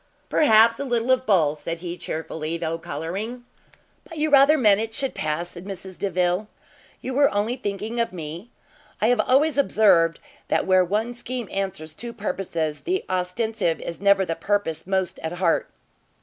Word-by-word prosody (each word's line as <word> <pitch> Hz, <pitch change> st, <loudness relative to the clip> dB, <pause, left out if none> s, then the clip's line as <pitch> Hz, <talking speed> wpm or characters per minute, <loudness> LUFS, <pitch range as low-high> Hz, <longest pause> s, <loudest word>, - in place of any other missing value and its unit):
"Perhaps 230 Hz, -5 st, +5 dB
a -, -, -2 dB
little 240 Hz, -1 st, 0 dB
of 260 Hz, 0 st, +2 dB
both!" 155 Hz, -7 st, +2 dB
said 165 Hz, 0 st, -4 dB
he, 175 Hz, 0 st, -6 dB
chearfully, 160 Hz, -1 st, -4 dB
though 165 Hz, 0 st, -3 dB
colouring. 195 Hz, -, -5 dB, 0.6 s
"But 330 Hz, -, -11 dB
you 305 Hz, 0 st, 0 dB
rather 285 Hz, +2 st, +6 dB
meant 210 Hz, -6 st, +4 dB
it 225 Hz, 0 st, -4 dB
should 270 Hz, -1 st, -1 dB
pass," 155 Hz, +3 st, -2 dB
said 175 Hz, +1 st, -10 dB
Mrs 190 Hz, -1 st, -7 dB
Delvile, 180 Hz, +1 st, 0 dB, 0.5 s
"you 260 Hz, -, -4 dB
were 280 Hz, +2 st, +5 dB, 0.3 s
thinking 205 Hz, +2 st, -3 dB
only -, -, +4 dB
of 230 Hz, -, -1 dB
me? 170 Hz, +4 st, -7 dB, 0.5 s
I 220 Hz, -, +3 dB
have 245 Hz, -2 st, +3 dB
always 280 Hz, +6 st, +3 dB
observed, 175 Hz, -11 st, +4 dB, 0.3 s
that -, -, +1 dB
where 185 Hz, -1 st, +4 dB
one 215 Hz, +6 st, -1 dB
scheme 245 Hz, -1 st, -5 dB
answers 190 Hz, -5 st, -3 dB
two 235 Hz, +8 st, -7 dB
purposes, 170 Hz, -7 st, -3 dB
the 375 Hz, +2 st, -2 dB
ostensive 185 Hz, 0 st, -1 dB
is 170 Hz, -, -6 dB
never 200 Hz, -1 st, +4 dB
the 165 Hz, -, -2 dB
purpose 175 Hz, -4 st, -2 dB
most 190 Hz, -1 st, -1 dB
at 160 Hz, +1 st, -4 dB
heart." 175 Hz, -2 st, +1 dB
195 Hz, 170 wpm, -24 LUFS, 170-235 Hz, 0.6 s, rather